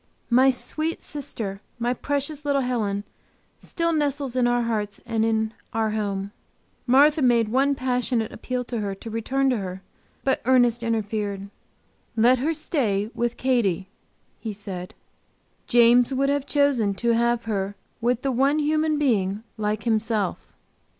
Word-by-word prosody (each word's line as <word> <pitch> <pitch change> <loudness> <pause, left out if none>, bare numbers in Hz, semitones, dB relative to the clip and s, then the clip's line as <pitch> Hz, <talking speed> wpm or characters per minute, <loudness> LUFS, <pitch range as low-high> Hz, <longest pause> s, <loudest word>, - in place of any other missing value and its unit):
My 260 +3 +6
sweet 310 +5 -1
sister, 220 -9 -4 0.2
my 240 +1 0
precious 285 +3 -2
little 280 -2 +1
Helen, 210 -5 -1 0.6
still 335 -1 -1
nestles 285 -4 -1
in 250 -1 +3
our 240 0 +2
hearts 210 -3 -2
and 225 -2 0
in 220 0 +1 0.2
our 220 -1 0
home. 200 -2 -2 0.6
Martha 290 +5 +5
made 235 -4 +3
one 275 +4 +2
passionate 250 -3 -1
appeal 250 +2 -3
to 240 -1 -4
her 200 -2 -3
to 225 +3 -9
return 265 +5 0
to 250 - +1
her, 190 -1 -6 0.4
but 265 - +1
Ernest 245 -2 +3
interfered: 210 -3 -2 0.6
"Let 240 +3 +4
her 295 +6 +1
stay 220 - -1
with 240 0 -2
Katy," 200 -8 +1 0.5
he 220 -2 -5
said. 190 -3 -7 0.7
"James 240 +1 +5
would 275 +1 +1
have 285 0 0
chosen 275 -9 +2
to 235 +3 +1
have 235 0 +2
her 200 -2 -2 0.3
with 245 +1 +1
the 270 - +1
one 270 +4 +2
human 310 0 +1
being 210 -7 +1
like 210 -1 -2
himself." 220 -3 -1
235 Hz, 145 wpm, -24 LUFS, 215-270 Hz, 0.7 s, My